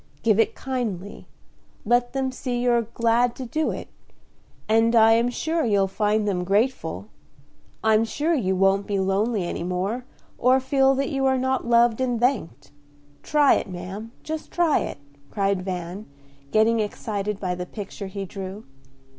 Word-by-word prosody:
Give 220 -2 +3
it 225 - +2
kindly, 225 -8 -4 0.6
let 245 +2 +2
them 265 -1 -1
see 250 -1 -3
you're 240 -1 +3
glad 235 +1 +1
to 260 - -6
do 310 +7 -1
it, - - -5 0.8
and 225 +2 +3
I 225 0 +7
am 230 +2 +3
sure 320 +6 -1
you'll 205 -4 +2
find 210 +2 0
them 180 -3 0
grateful; 215 +8 -1 0.7
I'm 220 0 +4
sure 300 +8 -1
you 190 - +1
won't 195 +1 +2
be 205 - -1
lonely 195 +2 0
any 175 - -4
more, 185 +8 -2 0.3
or 255 +2 +4
feel 270 0 +3
that 275 +1 -1
you 270 -1 +1
are 265 0 +2
not 260 -1 -1
loved 235 0 +4
and 245 -3 0
thanked. 225 - -1 0.5
Try 295 -2 +4
it, - - -4
ma'am, 190 +5 -7
just 315 0 -5
try 345 -3 +2
it," - - -4 0.3
cried 195 -2 0
Van, 180 +1 -5 0.4
getting 220 +4 +3
excited 210 -1 -3
by 180 -2 -2
the 180 0 -5
picture 200 0 -7
he 195 +1 -5
drew. 195 +2 -7
225 Hz, 160 wpm, -24 LUFS, 195-255 Hz, 0.8 s, I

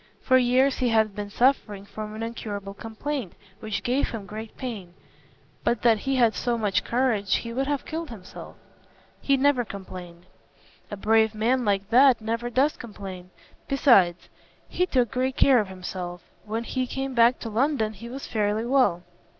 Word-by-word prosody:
For 260 -1 +4
years 255 +2 +3
he 250 - +2
has 220 -1 +3
been 205 0 -6
suffering 210 -4 +1
from 215 +1 -7
an 220 - -5
incurable 205 -4 -5
complaint 225 - -5 0.3
which 215 -3 -4
gave 255 +3 +1
him 220 -4 -6
great 215 +2 -8
pain. 205 -9 -6 0.7
But 235 - 0
that 230 -3 +4
he 270 +5 -1
had 235 -3 +4
so 235 +5 -1
much 205 -4 0
courage, 230 -6 +1
he 230 0 -3
would 270 +3 -1
have 285 -1 -2
killed 325 0 -5
himself." 200 -6 -10 0.7
"He 275 -1 +2
never 270 -2 +3
complained." 180 -4 -9 0.6
"A 205 - -6
brave 220 +2 +3
man 240 +3 +1
like 200 -1 0
that 260 +1 +6
never 230 +2 -3
does 270 +5 +1
complain. 195 -5 -9 0.4
Besides, 195 - +4 0.4
he 360 - 0
took 250 - +1
great 260 0 -1
care 265 -3 +5
of 210 - -1
himself. 180 -1 -6 0.2
When 220 +2 -3
he 255 +2 -2
came 270 +1 -4
back 235 +1 +5
to 230 - -4
London 230 -2 +1
he 230 +4 -10
was 270 +3 -7
fairly 215 +1 -1
well. 240 -9 +2
225 Hz, 170 wpm, -25 LUFS, 205-255 Hz, 0.7 s, that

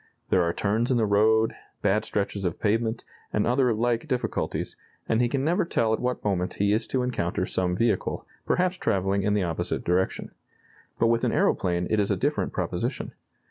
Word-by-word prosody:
There 95 - +4
are 85 -1 +1
turns 110 +6 0
in 130 - +3
the 115 - +3
road, 110 +2 +3 0.3
bad 105 +2 +2
stretches 100 -1 -2
of 90 -3 -2
pavement, 110 +2 0 0.3
and 105 - +1
other 125 0 +3
like 115 +1 0
difficulties, 125 -1 -2 0.3
and 115 +1 +2
he 120 - +2
can 135 +1 -1
never 165 +5 +2
tell 115 -9 +1
at - - 0
what 125 0 -2
moment 95 -3 -1
he 100 +1 +2
is 110 - 0
to 130 -1 0
encounter 90 -8 -1
some 90 -1 0
vehicle, 110 0 0 0.2
perhaps 180 0 +1
travelling 95 - 0
in 105 +1 +1
the 100 - +1
opposite 85 -2 -2
direction. 90 +2 0 0.7
But - - +2
with 115 0 +2
an - - +2
aeroplane 90 -1 +1
it 110 - +3
is 100 - +1
a - - +1
different - - 0
proposition. - - -3
110 Hz, 190 wpm, -26 LUFS, 95-120 Hz, 0.7 s, There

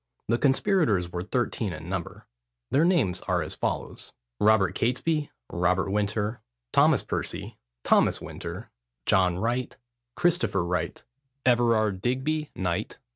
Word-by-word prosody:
The 115 +1 +2
conspirators 135 - +2
were 85 - -3
thirteen 110 -1 -1
in 80 +1 -8
number. 90 -2 -5 0.5
Their 145 - +4
names 145 - +2
were - - +1
as - - -6
follows:— - - -4 0.3
Robert 105 -4 +4
Catesby, 145 +7 0 0.2
Robert 90 +2 +1
Winter, 105 +2 -1 0.3
Thomas - - +5
Percy, 100 +5 -4 0.2
Thomas - - +3
Winter, - - -7 0.3
John 90 -2 +3
Wright, 120 +5 -2 0.4
Christopher 175 - +1
Wright, 90 +1 -2 0.4
Everard 115 -6 +3
Digby, 145 +6 -1
Knt. 90 -2 -2
110 Hz, 120 wpm, -27 LUFS, 95-130 Hz, 0.5 s, Thomas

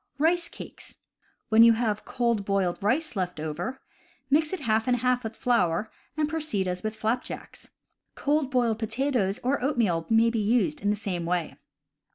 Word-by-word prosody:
Rice 335 +3 +2
Cakes. - - -10 0.3
— - - -41
When 220 +1 +6
you 230 0 +8
have 220 -2 -1
cold 235 -4 0
boiled 195 -3 0
rice 255 +8 0
left 180 -4 -2
over, 165 - -4 0.5
mix 305 +2 +3
it 375 - -3
half 220 -3 +1
and 250 -1 +3
half 250 +1 +1
with 220 0 -5
flour, 220 -5 +1 0.3
and 305 -1 +1
proceed 305 -12 -1
as 180 0 -2
with 215 0 -3
flapjacks. 220 +3 -4 0.5
Cold 290 -1 +1
boiled 240 -4 +1
potatoes 230 -3 0
or 255 +1 0
oatmeal 215 - +1
may 225 +1 +4
be 230 - -1
used 245 +8 +1
in 205 - +1
the 210 - +2
same 185 -5 -4
way. 175 -3 -1
230 Hz, 175 wpm, -27 LUFS, 200-260 Hz, 0.5 s, you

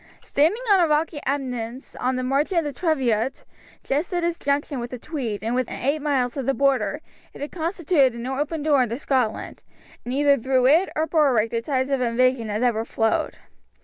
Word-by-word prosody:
Standing 335 - +1
on 390 - +6
a 345 - +4
rocky 305 0 0
eminence 255 -3 -4
on 255 +1 -1
the 255 - -2
margin 280 +8 0
of 335 - +3
the 290 -1 -4
Teviot, 265 -7 0 0.4
just 295 +8 -1
at 350 -1 -1
its 340 0 -1
junction 280 -1 -1
with 240 0 -5
the 250 - -6
Tweed 235 - -4
and 225 +2 -1
within 255 -1 -1
eight 285 +4 0
miles 265 -5 0
of 270 -4 -4
the 270 - +2
Border, 275 -1 +1 0.3
it - - -11
had 290 - -4
constituted 325 - +1
an 235 0 -6
open 290 +4 -2
door 295 -3 +4
into 235 -1 -1
Scotland, 255 -6 -1 0.4
and 245 - -5
either 280 +1 +3
through 255 +1 +2
it 320 +8 +4
or 315 - +1
through 320 0 0
Berwick 240 -7 +3
the 230 - -1
tides 260 +1 -1
of 270 -2 +1
invasion 245 -1 +1
had 210 +3 -1
ever 230 -3 +1
flowed. 225 -1 -1
270 Hz, 205 wpm, -23 LUFS, 245-300 Hz, 0.4 s, on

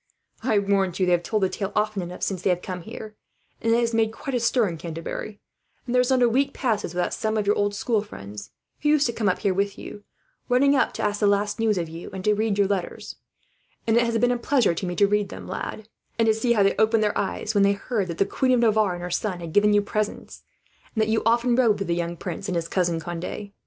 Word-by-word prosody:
"I 215 - +1
warrant 195 -3 +1
you 185 - +3
they 180 - +1
have 175 -1 +3
told 210 +3 -1
the 190 - +3
tale 195 0 -4
often 210 -1 0
enough 175 +1 -7
since 190 -3 -1
they 190 - +1
have 180 0 0
come 180 -2 -5
here; 220 +2 -9 0.5
and 225 - +1
it 230 - +4
has 235 -1 0
made 225 -1 +2
quite 275 +4 -6
a 245 - +1
stir 235 -1 +2
in 170 -3 -5
Canterbury, 170 +5 -6 0.5
and 245 - -4
there 250 - +5
is 250 - 0
not 260 -1 +3
a - - +6
week 275 +4 +1
passes 215 -8 -1
without 180 - 0
some 220 0 -1
of 210 - 0
your 205 - +3
old 205 0 0
school 220 +1 0
friends, 100 - -9 0.3
who 295 - +2
used 300 -1 +4
to 235 - 0
come 215 -4 +1
up 185 - 0
here 195 - 0
with 200 +1 -1
you, 205 - -9 0.5
running 275 +3 +4
up 265 - +2
to - - -4
ask 205 0 0
the 210 - +3
last 205 +1 +1
news 220 -3 +2
of 170 -2 -1
you, 165 +2 -8
and 190 -1 -6
to 210 0 +4
hear 215 +1 0
your 200 0 +2
letters 195 -3 -3 0.7
read; 225 - +3
and - - +5
it 235 - +4
has 230 0 0
been 245 +2 +3
a 245 - -1
pleasure 240 -6 +2
to 180 +3 -4
me 175 - -3
to 200 - +4
read 205 0 +1
them, - - -9
lad, 215 - -5 0.3
and 230 - +3
to 220 - +4
see 235 +2 +1
how 210 -3 +3
they 195 - +2
opened 220 0 +3
their 210 - 0
eyes 205 +2 -2
when 205 - +3
they 200 0 +4
heard 200 -1 -2
that 170 -1 -5
the 195 - +3
Queen 255 +5 +1
of 250 - +3
Navarre 215 -5 +3
and 175 - -7
her 180 - -5
son 185 0 -2
had 165 -2 -7
given 210 +1 +4
you 205 0 +4
presents, 210 +1 -4 0.5
and 220 - +1
that 215 - -1
you 220 - +2
often 240 +1 +3
rode 235 -5 +3
with 195 - -4
the 170 - +1
young 170 0 -3
prince, 180 +4 -5
and 180 - -1
his 165 -1 -1
cousin 170 -2 0
Conde. 175 +5 -6
205 Hz, 275 wpm, -24 LUFS, 185-225 Hz, 0.7 s, a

